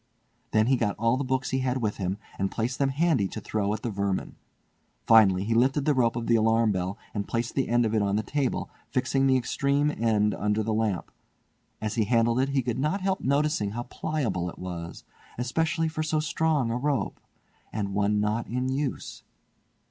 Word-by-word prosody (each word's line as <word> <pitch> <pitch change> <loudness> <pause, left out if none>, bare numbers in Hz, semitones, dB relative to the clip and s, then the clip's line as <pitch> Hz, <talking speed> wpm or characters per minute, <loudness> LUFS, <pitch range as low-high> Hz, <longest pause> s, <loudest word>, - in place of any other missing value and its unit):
Then 110 0 +3
he 130 +2 +3
got 105 -4 -1
all 115 +2 +2
the 135 - -1
books 130 0 -1
he 130 - +1
had 130 0 0
with 105 -1 -1
him, 95 0 -2 0.2
and 95 - +1
placed 120 +4 -2
them 140 -1 +2
handy 140 - +2
to 110 - -6
throw 105 -1 -1
at 110 0 -3
the 120 - -2
vermin. 100 -1 -2 0.7
Finally 100 -5 +6
he 115 +3 0
lifted 130 +4 +2
the 150 - +4
rope 120 -4 +2
of 120 -1 -3
the 115 - +3
alarm 110 0 +3
bell 95 0 -2 0.2
and 100 -1 -3
placed 115 0 -2
the 135 - 0
end 120 0 +3
of 110 - -1
it 110 - +2
on 100 0 +1
the 110 - 0
table, 140 +2 -2 0.2
fixing 135 +1 +1
the 130 -1 +4
extreme 140 +3 +1
end 105 -2 +2
under 105 +1 0
the 110 +1 -1
lamp. 110 -4 -1 0.7
As 110 -1 -2
he 110 -2 +1
handled 115 +2 +2
it 135 +1 +1
he 135 -2 +1
could 125 +1 -2
not 155 +8 0
help 190 0 0
noticing 140 -7 +1
how 120 +1 -3
pliable 125 - -2
it - - -11
was, 85 -2 -7 0.3
especially 160 +7 0
for 155 0 -3
so 155 0 0
strong 155 -5 +1
a 120 - 0
rope, 140 +1 -1 0.5
and 100 -2 -3
one 105 +1 +1
not 105 +3 0
in 125 +2 -2
use. 135 0 -3
115 Hz, 205 wpm, -27 LUFS, 105-135 Hz, 0.7 s, Finally